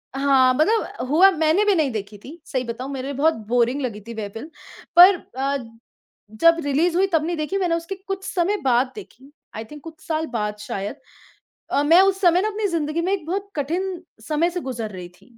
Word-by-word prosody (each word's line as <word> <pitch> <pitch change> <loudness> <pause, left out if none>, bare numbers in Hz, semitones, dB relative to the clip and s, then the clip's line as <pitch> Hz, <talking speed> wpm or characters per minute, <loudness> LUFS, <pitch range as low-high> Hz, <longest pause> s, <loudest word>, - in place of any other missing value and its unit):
हाँ, 270 -2 +4
मतलब 320 - 0
हुआ 350 +7 +6
मैंने 320 +3 +2
भी 415 - +4
नहीं 305 -6 +1
देखी 205 -2 -6
थी। 320 +6 -11
सही 260 -6 -2
बताऊँ 250 +3 -6
मेरे 265 -1 -5
लिए 280 - -4
बहुत 320 +3 +3
बोरिंग 245 +4 +1
लगी 225 -5 -4
थी 235 - -6
वह 220 -2 -5
फ़िल्म। 225 +8 -8 0.5
पर 360 +3 +9 0.2
अ, 275 +1 0 0.7
जब 330 +10 +4
रिलीज़ 315 +5 +1
हुई 385 +1 +3
तब 315 -1 +2
नहीं 345 +1 -2
देखी 305 +6 -2
मैंने 355 -3 +1
उसके 335 +3 -5
कुछ 390 0 -4
समय 380 +2 0
बाद 255 0 +2
देखी। 280 - -13 0.2
आई 220 - -5
थिंक 295 +5 -12
कुछ 320 -1 -11
साल 320 0 -1
बाद 210 -2 -2
शायद। 205 +2 -5 0.8
अ, 285 - +2
मैं 330 +5 +6
उस 385 0 +2
समय 355 -1 +4
ना 420 - 0
अपनी 425 0 -2
ज़िदंगी 330 -2 -2
में 365 +3 -1
एक 375 -6 -3
बहुत 390 +4 -3
कठिन 350 +5 -3 0.2
समय 315 +3 +1
से 355 - -4
गुज़र 240 -6 -5
रही 180 -2 -8
थी। 225 +6 -24
305 Hz, 210 wpm, -22 LUFS, 255-355 Hz, 0.8 s, पर